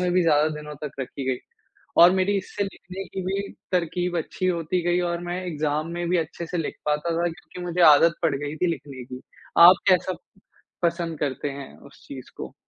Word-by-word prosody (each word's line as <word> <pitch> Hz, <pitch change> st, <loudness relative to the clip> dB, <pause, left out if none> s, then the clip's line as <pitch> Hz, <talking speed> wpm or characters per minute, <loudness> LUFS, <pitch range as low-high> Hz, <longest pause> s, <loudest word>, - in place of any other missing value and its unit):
में 180 Hz, -1 st, +1 dB
भी 180 Hz, -, +4 dB
ज़्यादा 155 Hz, -2 st, +4 dB
दिनों 150 Hz, 0 st, -8 dB
तक 140 Hz, -1 st, -6 dB
रखी 135 Hz, +1 st, -5 dB
गई। 125 Hz, -, -1 dB, 0.6 s
और 175 Hz, -, +9 dB
मेरी 190 Hz, +2 st, +1 dB
इससे 200 Hz, +1 st, -3 dB
लिखने 195 Hz, 0 st, -8 dB
की 190 Hz, -, -5 dB
भी 195 Hz, +1 st, -2 dB, 0.2 s
तरकीब 175 Hz, 0 st, 0 dB
अच्छी 185 Hz, +3 st, -3 dB
होती 175 Hz, 0 st, 0 dB
गई 175 Hz, +1 st, +1 dB
और 170 Hz, 0 st, -2 dB
मैं 180 Hz, +1 st, -2 dB
एग्ज़ाम 155 Hz, -1 st, -1 dB
में 175 Hz, 0 st, -3 dB
भी 180 Hz, -, +2 dB
अच्छे 165 Hz, +1 st, -4 dB
से 175 Hz, -, -3 dB
लिख 160 Hz, -, -3 dB
पाता 150 Hz, +3 st, 0 dB
था 175 Hz, +1 st, +1 dB
क्योंकि 180 Hz, +1 st, -10 dB
मुझे 175 Hz, +1 st, -2 dB
आदत 165 Hz, +3 st, +6 dB
पड़ 160 Hz, -4 st, +2 dB
गई 145 Hz, +2 st, -5 dB
थी 180 Hz, -, +1 dB
लिखने 135 Hz, -4 st, -6 dB
की। 125 Hz, +1 st, -9 dB, 0.5 s
आप 185 Hz, -, +8 dB
कैसा 185 Hz, 0 st, +3 dB, 0.7 s
पसंद 170 Hz, -2 st, -1 dB
करते 145 Hz, 0 st, -2 dB
हैं 140 Hz, -1 st, -9 dB
उस 140 Hz, -, -17 dB
चीज़ 135 Hz, -3 st, -9 dB
को? -, -, -7 dB
170 Hz, 205 wpm, -24 LUFS, 150-180 Hz, 0.7 s, और